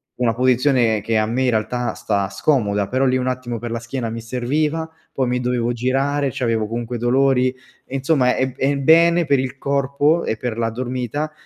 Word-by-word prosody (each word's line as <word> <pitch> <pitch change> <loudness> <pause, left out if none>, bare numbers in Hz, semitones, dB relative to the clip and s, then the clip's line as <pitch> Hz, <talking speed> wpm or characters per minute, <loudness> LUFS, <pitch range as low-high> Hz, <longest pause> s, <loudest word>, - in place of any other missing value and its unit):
una 120 -2 +1
posizione 125 -2 +2
che 110 +2 0
a 110 - +1
me 125 +4 0
in 130 - +2
realtà 120 +2 -1
sta 100 -2 -1
scomoda, 105 -2 0
però 130 +4 +1
lì 130 0 +2
un 130 0 -2
attimo 125 -2 -3
per 120 +1 -5
la 115 0 -3
schiena 115 0 -4
mi 115 +1 -5
serviva, 150 +7 -1 0.2
poi 130 -2 -1
mi 125 0 0
dovevo 120 -1 0
girare, 135 +4 0
c’avevo 115 -3 -1
comunque 120 +2 -4
dolori 130 +2 +2 0.4
e 135 - -7
insomma 135 -2 +2
è 130 0 0
è 135 +1 0
è 140 - 0
bene 170 +4 +4
per 140 - +3
il 130 +1 -3
corpo 140 +4 +1
e - - -1
per 120 -1 -4
la 115 -1 0
dormita 125 +5 -3
125 Hz, 200 wpm, -20 LUFS, 115-135 Hz, 0.4 s, bene